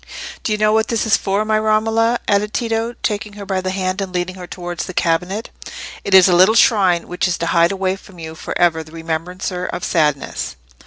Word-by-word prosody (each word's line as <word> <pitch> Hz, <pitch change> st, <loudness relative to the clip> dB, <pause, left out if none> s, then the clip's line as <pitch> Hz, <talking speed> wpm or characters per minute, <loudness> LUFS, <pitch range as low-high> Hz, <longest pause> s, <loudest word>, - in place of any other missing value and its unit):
"Do -, -, -1 dB
you 210 Hz, -, +1 dB
know 215 Hz, 0 st, +3 dB
what 220 Hz, 0 st, +2 dB
this 230 Hz, -1 st, 0 dB
is 220 Hz, -, +4 dB
for, 200 Hz, +2 st, -1 dB
my 215 Hz, 0 st, +2 dB
Romola?" 225 Hz, +2 st, +2 dB
added 205 Hz, +1 st, +1 dB
Tito, 230 Hz, 0 st, -1 dB
taking 210 Hz, -1 st, -2 dB
her 205 Hz, -1 st, -8 dB
by 190 Hz, -1 st, -1 dB
the 185 Hz, -, -3 dB
hand, 185 Hz, +1 st, -2 dB
and 190 Hz, -1 st, -4 dB
leading 180 Hz, 0 st, -2 dB
her 180 Hz, -1 st, -9 dB
towards 175 Hz, 0 st, -5 dB
the 185 Hz, -, -8 dB
cabinet. 180 Hz, +6 st, -1 dB, 0.5 s
"It 195 Hz, -, +2 dB
is 190 Hz, -1 st, +8 dB
a 180 Hz, -, +3 dB
little 190 Hz, +5 st, +5 dB
shrine, 190 Hz, -7 st, +4 dB
which 180 Hz, +1 st, -1 dB
is 180 Hz, -, -1 dB
to 170 Hz, -, -2 dB
hide 170 Hz, +1 st, +3 dB
away 190 Hz, -1 st, -1 dB
from 190 Hz, -1 st, -16 dB
you 160 Hz, -1 st, -7 dB
for 160 Hz, -, -5 dB
ever 165 Hz, -2 st, +2 dB
that 155 Hz, -, -16 dB
remembrancer 175 Hz, +3 st, -4 dB
of 180 Hz, -, -5 dB
sadness. 150 Hz, -, -1 dB
190 Hz, 220 wpm, -19 LUFS, 175-215 Hz, 0.5 s, is